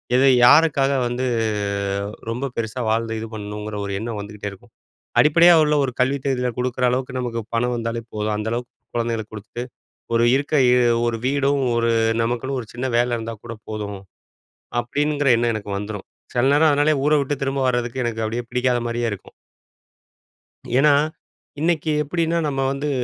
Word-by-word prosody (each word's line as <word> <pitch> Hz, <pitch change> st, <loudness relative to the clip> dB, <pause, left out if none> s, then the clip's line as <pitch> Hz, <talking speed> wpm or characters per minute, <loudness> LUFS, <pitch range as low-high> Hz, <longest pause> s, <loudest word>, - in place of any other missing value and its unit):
எது 130 Hz, -, +5 dB, 0.2 s
யாருக்காக 140 Hz, -1 st, +5 dB, 0.2 s
வந்து 120 Hz, +2 st, -2 dB, 1.0 s
ரொம்ப 125 Hz, +4 st, -2 dB
பெருசா 115 Hz, +2 st, -3 dB
வாழ்ந்து 115 Hz, 0 st, 0 dB
இது 110 Hz, -, -5 dB
பண்ணணும்ங்கிற 105 Hz, 0 st, -6 dB
ஒரு 100 Hz, -, -4 dB
எண்ணம் 115 Hz, -1 st, -4 dB
வந்துக்கிட்டே 105 Hz, 0 st, -6 dB
இருக்கும் 95 Hz, -, -16 dB, 0.5 s
அடிப்படையா 170 Hz, +3 st, +7 dB
உள்ள 150 Hz, 0 st, +2 dB
ஒரு 130 Hz, -, -1 dB
கல்வி 135 Hz, +2 st, +2 dB
தகுதியில 125 Hz, -2 st, 0 dB
குடுக்குற 125 Hz, 0 st, -2 dB
அளவுக்கு 130 Hz, +1 st, -2 dB
நமக்கு 120 Hz, -2 st, -3 dB
பணம் 125 Hz, +1 st, +1 dB
வந்தாலே 115 Hz, 0 st, -3 dB
போதும். 105 Hz, 0 st, -1 dB
அந்த 110 Hz, +1 st, -3 dB
அளவுக்கு 120 Hz, +1 st, -4 dB, 0.2 s
கொழந்தைகளுக்கு 115 Hz, -2 st, -2 dB
கொடுத்துட்டு 110 Hz, +3 st, -7 dB, 0.5 s
ஒரு 115 Hz, 0 st, +4 dB
இருக்க 145 Hz, +2 st, -2 dB, 0.2 s
இ -, -, +4 dB, 0.3 s
ஒரு 115 Hz, -, 0 dB
வீடும் 140 Hz, 0 st, +1 dB
ஒரு 115 Hz, 0 st, +2 dB, 0.3 s
நமக்குன்னு 120 Hz, +3 st, -2 dB
ஒரு 115 Hz, -, -10 dB
சின்ன 130 Hz, +2 st, -2 dB
வேலை 120 Hz, 0 st, +1 dB
இருந்தா 115 Hz, 0 st, -5 dB
கூட 115 Hz, -1 st, -6 dB
போதும். 105 Hz, -2 st, -5 dB, 0.8 s
அப்படிங்கிற 145 Hz, +3 st, 0 dB
எண்ணம் 120 Hz, 0 st, +1 dB
எனக்கு 105 Hz, -1 st, -6 dB
வந்துரும். 105 Hz, -1 st, -6 dB, 0.3 s
செல 120 Hz, +1 st, +3 dB
நேரம் 155 Hz, +2 st, +5 dB
அதனாலேயே 145 Hz, -1 st, +2 dB
ஊர 150 Hz, -, +3 dB
விட்டு 140 Hz, +1 st, -1 dB
திரும்ப 135 Hz, 0 st, -1 dB
வர்றதுக்கு 120 Hz, +1 st, -1 dB
எனக்கு 115 Hz, -1 st, -2 dB
அப்படியே 115 Hz, +3 st, -3 dB
பிடிக்காத 125 Hz, 0 st, +1 dB
மாதிரியே 120 Hz, 0 st, -2 dB
இருக்கும். 100 Hz, -, -8 dB, 1.5 s
ஏன்னா, 150 Hz, +1 st, +5 dB, 0.7 s
இன்னைக்கி 160 Hz, -2 st, +1 dB
எப்டின்னா, 165 Hz, +2 st, 0 dB
நம்ம 135 Hz, -2 st, -1 dB
வந்து 145 Hz, +2 st, -2 dB
120 Hz, 160 wpm, -22 LUFS, 115-140 Hz, 1.5 s, அடிப்படையா